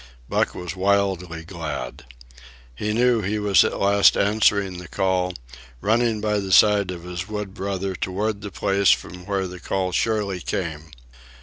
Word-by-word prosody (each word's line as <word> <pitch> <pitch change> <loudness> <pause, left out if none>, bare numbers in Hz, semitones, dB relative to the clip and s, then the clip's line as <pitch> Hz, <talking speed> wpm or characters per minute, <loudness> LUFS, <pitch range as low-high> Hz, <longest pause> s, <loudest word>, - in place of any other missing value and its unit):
Buck - - 0
was 90 0 -6
wildly 95 -4 0
glad. 80 -9 -6 0.7
He 105 +12 -3
knew 120 +1 +3
he 105 +2 -1
was 105 -2 +4
at - - -2
last 100 0 +4
answering 100 -3 +2
the 90 - -10
call, 95 -2 0 0.4
running 115 - +1
by 105 -1 0
the 95 -1 -4
side 100 0 +5
of 90 -2 -6
his 90 0 -5
wood 105 -2 -5
brother 95 -1 -3
toward 100 +3 -2
the 100 - -6
place 100 +1 +1
from 90 0 0
where 100 -2 -1
the 90 0 -8
call 95 0 -2
surely 100 -1 0
came. 80 -3 -4
95 Hz, 155 wpm, -23 LUFS, 90-105 Hz, 0.7 s, side